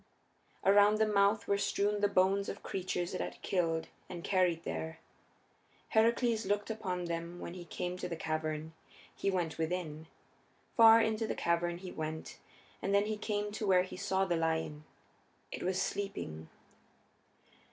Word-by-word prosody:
Around 205 +2 +6
the 220 - +4
mouth 205 0 +3
were 200 0 +2
strewn 205 +1 +1
the 205 - +5
bones 195 +1 +2
of - - -7
creatures 180 -2 -2
it - - -2
had 90 0 -5
killed 165 -3 0 0.2
and 175 -2 -6
carried 180 -4 +2
there. 160 0 -4 0.9
Heracles 230 0 +3
looked 205 +2 -1
upon 185 -5 -3
them 170 +1 -4
when 170 - -6
he 180 -1 -8
came 180 +2 -4
to 180 - -4
the 170 - -3
cavern. 155 0 -3 0.4
He 195 - 0
went 175 -4 -1
within. 160 -2 -3 0.7
Far 225 -1 +9
into 220 0 0
the - - -2
cavern 170 0 0
he 180 0 -8
went, 160 0 -5 0.4
and 200 - +1
then 200 +1 +4
he 215 0 -1
came 210 -1 -2
to 215 0 -3
where 185 -1 +5
he 185 - -8
saw 190 +1 0
the 175 -3 0
lion. 160 -2 -1 0.7
It - - -5
was 185 +1 0
sleeping. 195 - -3
185 Hz, 160 wpm, -33 LUFS, 165-205 Hz, 0.9 s, Far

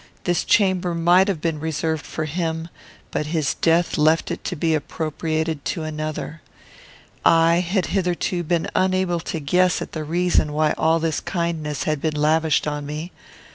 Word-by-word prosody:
This 175 -1 +1
chamber 185 -4 +2
might 175 +3 +4
have 185 -7 -1
been 160 -2 -1
reserved 160 0 -2
for 155 - -3
him, 165 +1 -3 0.4
but 150 - -2
his 155 -4 0
death 165 0 +1
left 155 +2 +3
it - - -5
to 180 - -2
be 160 0 +1
appropriated 155 0 -2
to 165 - -2
another. 155 0 -5 0.8
I 165 0 +5
had 180 +1 0
hitherto 180 -1 0
been 170 0 0
unable 185 -2 +1
to 165 0 -4
guess 180 +5 +2
at - - -6
the 155 - -4
reason 170 -1 +1
why 155 0 +2
all 160 +1 +2
this 165 -1 -1
kindness 165 -5 -2
had 155 -2 -1
been 155 -2 -1
lavished 155 +1 +2
on 150 -1 -3
me. 155 +4 -5
160 Hz, 165 wpm, -22 LUFS, 155-175 Hz, 0.8 s, I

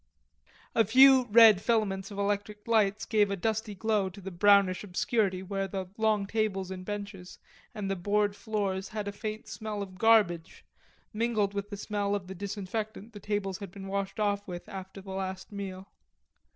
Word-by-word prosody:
A 225 - +4
few 260 +4 +7
red 220 -3 +7
filaments 200 -4 0
of 200 - -9
electric 205 +1 -2
lights 215 -2 +2
gave 210 -2 +2
a 200 - -1
dusty 215 +2 -2
glow 210 -1 +1
in 190 +1 -10
the 195 - -6
brownish 200 +1 +4
obscurity 195 0 0
where 195 0 -2
the 190 -1 -5
long 220 -2 +1
tables 195 -3 -1
and 185 -1 -6
benches 200 -2 -7 0.4
and 205 -2 -3
the 195 - -1
board 205 +2 +1
floors 200 -3 -2
had 210 -1 -4
a - - -2
faint 215 +1 -6
smell 215 -2 -4
of 185 -2 -11
garbage 205 -8 +3 0.5
mingled 215 -2 0
with 200 0 -4
the 205 - -6
smell 205 0 -1
of 200 -2 -4
the 190 - -7
disinfectant 210 +3 -5
the 205 - -9
tables 200 -2 -2
had 200 -3 -7
been 195 +2 -10
washed 195 +1 -3
off 205 -1 0
with 175 -2 -7
after 190 0 -8
the 190 0 -9
last 190 0 -5
meal. 195 -1 -6
200 Hz, 180 wpm, -29 LUFS, 190-215 Hz, 0.5 s, few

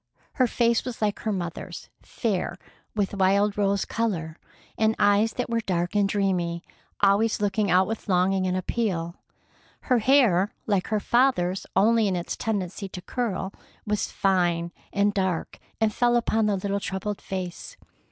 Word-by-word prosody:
Her 255 -3 +3
face 235 0 +2
was 250 -1 -6
like 210 -2 0
her 220 - -2
mother's, 175 -4 -5
fair, 195 -5 -2 0.4
with 205 -2 0
wild 200 +1 +2
rose 200 -1 +1
color, 175 -9 -2 0.4
and 220 0 +2
eyes 205 +2 +3
that 250 - -2
were 230 0 0
dark 175 -5 -1
and 200 -1 +3
dreamy, 180 -4 0 0.4
always 205 +3 +3
looking 205 0 0
out 185 +1 +5
with 225 +1 -5
longing 185 +1 +2
and 185 0 0
appeal. 185 -4 -2 0.6
Her 250 -3 +2
hair, 220 -6 +3
like 200 -4 0
her 215 -1 0
father's 205 -7 +1
only 220 +2 +4
in 190 - 0
its 175 -1 -3
tendency 195 -2 -3
to 180 - -8
curl, 200 -6 -3 0.3
was 210 -1 -1
fine 175 -3 +1 0.2
and 205 0 +2
dark, 190 -4 -2 0.2
and 220 -1 +2
fell 240 0 +2
about 225 -2 +2
the 205 - +2
little 200 +1 -1
troubled 200 +1 -4
face. 185 -2 -6
200 Hz, 155 wpm, -25 LUFS, 185-220 Hz, 0.6 s, out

